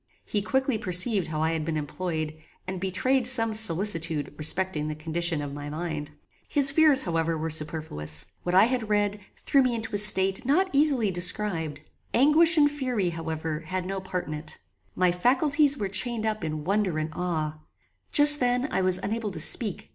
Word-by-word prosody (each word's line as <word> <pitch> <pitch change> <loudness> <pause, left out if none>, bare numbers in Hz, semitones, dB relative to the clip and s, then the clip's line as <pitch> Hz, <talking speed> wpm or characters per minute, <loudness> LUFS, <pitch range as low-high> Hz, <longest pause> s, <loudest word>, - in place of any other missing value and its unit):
He 205 - -2
quickly 265 +1 -2
perceived 185 0 0
how 155 -1 -4
I 160 - 0
had 160 -1 -3
been 155 0 -4
employed, 155 0 -5 0.3
and 185 -1 -7
betrayed 240 +7 -1
some 225 -4 +6
solicitude 170 -7 +1
respecting 160 0 +1
the 155 - -5
condition 160 0 -2
of 140 -1 -7
my 145 0 -8
mind. 155 -1 -6 0.4
His 280 -2 +5
fears, 290 -3 +4
however, 165 -1 -2
were 160 +1 -4
superfluous. 150 - -3 0.2
What 180 0 -3
I 190 - +6
had 240 -3 -3
read, 205 0 -1 0.2
threw 275 - +1
me 255 -2 0
into 220 -2 -7
a 205 - +1
state 195 -2 +4
not 360 +9 0
easily 275 -8 +2
described. 175 -4 -1 0.3
Anguish 315 +6 +5
and 290 -1 +3
fury, 250 -11 -3
however, 160 -1 -5
had 180 +3 -6
no 195 +1 -5
part 185 -1 -5
in 155 - -7
it. 150 0 -8 0.4
My 180 0 +1
faculties 275 - +1
were 205 - -3
chained 220 +3 -1
up 215 -4 -3
in 155 -1 -5
wonder 195 -1 -1
and 155 0 -4
awe. 155 -4 -4 0.5
Just 295 0 +8
then, 250 +2 -1
I - - -1
was 185 -1 +1
unable 220 0 -3
to 180 -5 -8
speak. 205 +5 -2
185 Hz, 180 wpm, -25 LUFS, 160-240 Hz, 0.5 s, Just